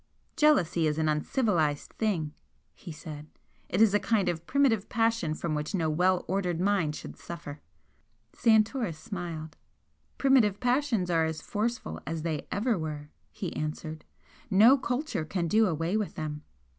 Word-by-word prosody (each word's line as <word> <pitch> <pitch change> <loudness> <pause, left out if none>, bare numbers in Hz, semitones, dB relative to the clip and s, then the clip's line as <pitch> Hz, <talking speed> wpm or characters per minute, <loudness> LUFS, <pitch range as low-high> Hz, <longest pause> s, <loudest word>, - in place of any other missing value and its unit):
"Jealousy 180 - +3
is 150 0 -1
an 160 -1 +1
uncivilised 155 - 0
thing," 170 -9 -1 0.4
he 175 - -10
said 150 -1 -9 0.4
"It 190 +5 +4
is 210 -3 +4
a 205 - +4
kind 205 -2 +1
of 170 -1 -4
primitive 250 -8 +2
passion 225 -8 +1
from 165 0 -3
which 150 +6 -2
no 160 -4 +1
well 180 +3 +2
ordered 180 -2 -1
mind 185 -6 +1
should - - -8
suffer." 155 -4 -8 0.7
Santoris 220 - +2
smiled. 165 -6 -6 0.6
"Primitive 245 -8 +4
passions 245 -7 +1
are 165 -1 +3
as 160 -1 -3
forceful 235 +4 -3
as 160 0 -3
they 160 -3 -3
ever 215 -1 0
were," 150 -2 -5 0.2
he 180 -5 -6
answered. 155 +1 -4 0.5
"No 220 +7 +7
culture 255 - -2
can 170 +2 -2
do 215 +5 +4
away 165 +2 -1
with 215 -2 -2
them. 150 -1 -4
180 Hz, 150 wpm, -29 LUFS, 155-220 Hz, 0.7 s, No